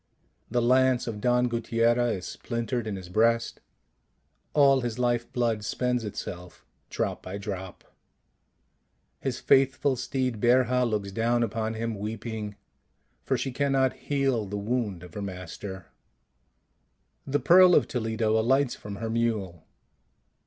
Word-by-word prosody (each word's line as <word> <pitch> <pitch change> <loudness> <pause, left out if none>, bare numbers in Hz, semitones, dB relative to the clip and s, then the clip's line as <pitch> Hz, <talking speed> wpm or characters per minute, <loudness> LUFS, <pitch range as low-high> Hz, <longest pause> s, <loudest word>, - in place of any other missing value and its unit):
The 120 -1 +1
lance 130 0 +3
of 110 -3 -5
Don 125 0 +3
Guttiera 115 0 +1
is 90 -2 -5
splintered 115 -1 -3
in 105 - -3
his 95 -2 -8
breast: 115 +4 +1 0.9
all 140 -2 +5
his 120 -2 -3
life 120 -1 0
blood 115 -4 0
spends 125 +1 -1
itself 90 -4 -7 0.2
drop - - -2
by 95 +2 -6
drop. 95 -2 -6 1.4
His 130 -2 -3
faithful 135 +1 +3
steed, 130 -3 -2
Berja, 125 0 +3
looks 100 -3 -2
down 115 +3 +1
upon 110 0 -2
him 115 +1 -2
weeping, 110 0 -5 0.7
for - - +1
she 135 - -3
can 140 +2 0
not 130 -1 +3
heal 135 -7 -1
the 105 +2 -4
wound 105 -4 -2
of 90 - -12
her 105 - -5
master. 95 0 -7 1.4
The 145 +1 +1
Pearl 180 +2 +7
of - - +4
Toledo 110 -2 0
alights 130 +3 +2
from 105 -1 -8
her 115 +3 -4
mule. 105 -8 -2
115 Hz, 135 wpm, -27 LUFS, 105-125 Hz, 1.4 s, Pearl